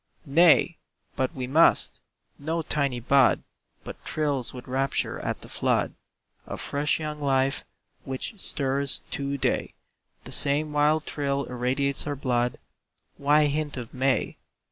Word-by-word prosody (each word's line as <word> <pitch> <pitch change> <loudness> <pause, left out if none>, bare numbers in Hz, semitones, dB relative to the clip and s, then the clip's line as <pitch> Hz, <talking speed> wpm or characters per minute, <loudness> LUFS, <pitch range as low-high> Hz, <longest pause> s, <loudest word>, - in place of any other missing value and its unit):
Nay, 165 +3 +5 0.4
but 130 -2 0
we 130 -2 -3
MUST! 155 +6 +3 0.4
No 160 +3 -2
tiny 140 -5 0
bud 130 +2 +4 0.4
But - - -9
thrills 145 -5 -1
with 125 0 -10
rapture 135 +1 -1
at - - -3
the - - -10
flood - - 0 0.5
Of - - -6
fresh 145 +2 0
young 150 -1 -5
life 135 0 +1 0.4
which 140 - -5
stirs 140 0 0
to 140 0 -2
day. - - -1 0.5
The - - -9
same 150 +2 +1
wild 150 +1 +3
thrill 140 -1 -1
irradiates 130 +3 0
our 145 - -1
blood; 125 -2 0 0.6
Why 150 +2 +4
hint 150 -1 -1
of 120 -3 -7
"May"? 130 -2 0
140 Hz, 135 wpm, -26 LUFS, 130-150 Hz, 0.6 s, Nay